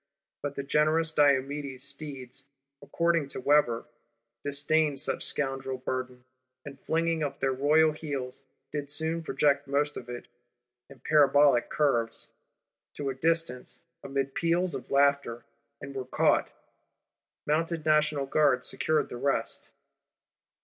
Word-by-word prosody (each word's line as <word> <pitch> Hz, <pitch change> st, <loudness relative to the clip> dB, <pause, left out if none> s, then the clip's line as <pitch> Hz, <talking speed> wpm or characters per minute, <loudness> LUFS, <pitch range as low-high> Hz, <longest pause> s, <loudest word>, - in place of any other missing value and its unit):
But 145 Hz, -1 st, -4 dB
the 140 Hz, -, -4 dB
generous 155 Hz, +3 st, +2 dB
Diomedes' 140 Hz, -2 st, +1 dB
steeds, 135 Hz, -2 st, -7 dB, 0.4 s
according 170 Hz, -3 st, 0 dB
to -, -, -6 dB
Weber, 130 Hz, -4 st, +2 dB, 0.6 s
disdained 145 Hz, +1 st, +1 dB
such -, -, -1 dB
scoundrel 135 Hz, -2 st, -2 dB
burden; 125 Hz, -1 st, -5 dB, 0.4 s
and, 140 Hz, -1 st, -9 dB
flinging 165 Hz, 0 st, 0 dB
up 145 Hz, -2 st, -3 dB
their 135 Hz, -1 st, +1 dB
royal 155 Hz, +4 st, +4 dB
heels, 140 Hz, -5 st, -5 dB, 0.3 s
did 145 Hz, -1 st, -4 dB
soon 160 Hz, +3 st, -1 dB
project 145 Hz, -3 st, +1 dB
most 145 Hz, +1 st, 0 dB
of 120 Hz, -, -8 dB
it, 120 Hz, 0 st, -7 dB, 0.6 s
in 135 Hz, -3 st, -15 dB
parabolic 145 Hz, -4 st, +4 dB
curves, 120 Hz, -7 st, 0 dB, 0.6 s
to 140 Hz, -2 st, -3 dB
a -, -, -4 dB
distance, 160 Hz, -2 st, -1 dB, 0.2 s
amid 135 Hz, 0 st, -2 dB
peals 170 Hz, +2 st, +1 dB
of 135 Hz, -, -5 dB
laughter: 140 Hz, -4 st, +2 dB, 0.3 s
and 140 Hz, 0 st, -8 dB
were 130 Hz, -1 st, -4 dB
caught. 125 Hz, -, +2 dB, 1.0 s
Mounted 165 Hz, +1 st, -1 dB
National 150 Hz, -2 st, +2 dB
Guards 135 Hz, -3 st, +2 dB
secured 155 Hz, 0 st, +1 dB
the 120 Hz, -, -6 dB
rest. 140 Hz, +2 st, -2 dB
140 Hz, 125 wpm, -28 LUFS, 135-155 Hz, 1.0 s, royal